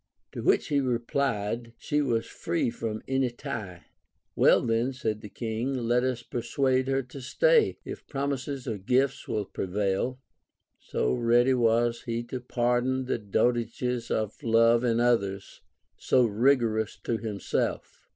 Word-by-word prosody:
To - - -6
which - - +2
he 145 - +2
replied, 120 -3 -1
she 150 +5 0
was 120 -5 0
free 165 -7 -2
from 110 -2 -4
any 135 -1 +1
tie. 115 - -7 0.5
Well, - - +5
then, 115 +3 0
said 110 -4 -3
the 105 - -9
King, 115 +5 -3
let 120 0 +1
us 125 -2 -1
persuade 130 +2 0
her 135 0 +1
to 130 +2 -10
stay, 470 - +3
if - - -8
promises 140 -1 -3
or 110 -4 -3
gifts 125 +7 +1
will 105 -2 -1
prevail. 100 +8 -2 0.6
So 60 0 -1
ready 120 - +3
was 115 -1 +2
he 115 0 -2
to 130 - -1
pardon 125 +1 0
the 125 - -1
dotages 120 +3 0
of 110 -1 -2
love 115 +1 +4
in 115 -1 +2
others, 100 -5 0 0.4
so 125 - +3
rigorous 115 -1 +2
to 115 - -1
him 110 -3 -5
self. - - -3
120 Hz, 145 wpm, -27 LUFS, 115-130 Hz, 0.6 s, Well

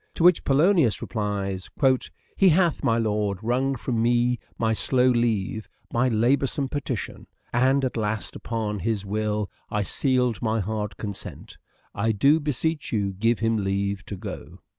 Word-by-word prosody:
To - - -1
which 180 -1 +6
Polonius 150 - +3
replies: 100 -4 -3 0.3
" - - -17
He 195 - +5
hath, 170 -1 +2
my 115 - +3
lord, 105 -3 0
wrung 130 +4 +1
from 120 -2 -2
me 120 +1 +2 0.2
my 110 -1 +1
slow 125 +3 +2
leave 110 -4 0 0.2
By 125 +2 +2
laboursome 135 +4 +1
petition, 130 -7 -4 0.3
and 130 +3 +3
at 130 - -3
last 110 -2 -2
Upon 110 -3 -3
his 105 +1 -2
will 105 0 -1 0.2
I 105 -2 0
seal'd 125 +1 0
my 110 -1 0
hard 105 -1 -3
consent: 100 -2 -7 0.4
I 110 +3 0
do 140 +9 +4
beesech 150 +1 -2
you, 100 -4 0
give 115 +4 +1
him 115 0 +1
leave 100 0 -1
to 100 - -5
go." - - -8
115 Hz, 155 wpm, -25 LUFS, 105-130 Hz, 0.4 s, which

